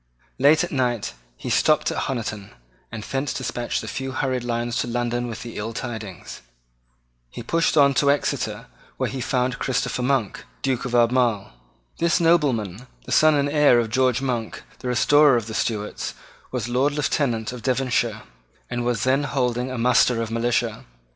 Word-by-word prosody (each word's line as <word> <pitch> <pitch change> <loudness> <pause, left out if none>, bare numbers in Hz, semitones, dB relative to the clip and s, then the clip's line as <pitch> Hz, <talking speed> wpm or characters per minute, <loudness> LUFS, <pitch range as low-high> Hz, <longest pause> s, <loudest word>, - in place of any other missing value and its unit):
Late 150 +5 +5
at 175 - -4
night 125 -5 -1 0.2
he - - -5
stopped - - +3
at - - -2
Honiton, 110 -6 -4 0.4
and 110 -2 -6
thence 135 +3 -3
despatched 120 -1 -3
a - - -7
few 135 0 -4
hurried 130 -2 -1
lines 120 0 -2
to - - -1
London 120 0 -1
with 115 -1 -6
the 115 -1 -8
ill 110 +2 -4
tidings. 110 - -7 0.9
He 120 - -8
then - - -12
pushed 165 +1 +1
on 140 -1 +6
to 140 +1 +2
Exeter, 120 -6 -1 0.3
where 130 -2 -1
he 130 -1 -4
found 125 +1 -1
Christopher 130 -1 -1
Monk, 125 -5 0 0.2
Duke 130 -3 0
of 125 -1 -2
Albemarle. 120 - +2 0.5
This 170 +2 +2
nobleman, 130 - +1 0.2
the - - -8
son 155 -1 +5
and 140 0 +2
heir 145 -4 +4
of 115 -2 -2
George 130 +1 +2
Monk, 120 -4 -3 0.2
the - - -6
restorer 140 +2 +5
of 115 - -3
the 110 - -7
Stuarts, 105 -2 -3 0.4
was 125 -4 -2
Lord 130 +4 +1
Lieutenant 130 -6 -1
of 125 - -8
Devonshire, 120 -4 0 0.5
and 120 0 -2
was 120 -3 0
then 135 +3 +2
holding 125 -2 -1
a 130 - -4
muster 125 0 +3
of 115 -1 -3
militia. 115 +1 0
125 Hz, 175 wpm, -23 LUFS, 115-135 Hz, 0.9 s, on